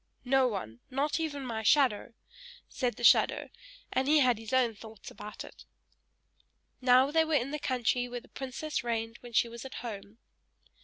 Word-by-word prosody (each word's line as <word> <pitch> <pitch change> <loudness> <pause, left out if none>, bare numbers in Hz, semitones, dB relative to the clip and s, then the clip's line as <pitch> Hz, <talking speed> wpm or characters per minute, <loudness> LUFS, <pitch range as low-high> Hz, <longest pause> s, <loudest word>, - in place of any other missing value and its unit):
"No 265 0 +4
one 185 - -5
not 285 +5 -1
even 290 -4 -3
my 225 -3 -3
shadow!" 235 -2 +2 0.5
said 245 -4 -2
the 240 - -9
shadow, - - +4 0.4
and 265 - +1
he 305 +1 +5
had 250 -5 +3
his 225 -1 -8
own 255 -3 +3
thoughts 220 0 -12
about 210 +1 -8
it! - - -13 1.2
Now 255 +2 +5
they 320 +1 +4
were 320 -1 0
in 275 0 0
the 300 - -3
country 245 -2 0
where 245 0 -5
the - - -19
princess 275 +3 -4
reigned 225 -1 -3
when 240 -1 -12
she 235 - +3
was 235 0 -9
at 265 - -9
home. 210 -1 -8
245 Hz, 175 wpm, -30 LUFS, 225-270 Hz, 1.2 s, he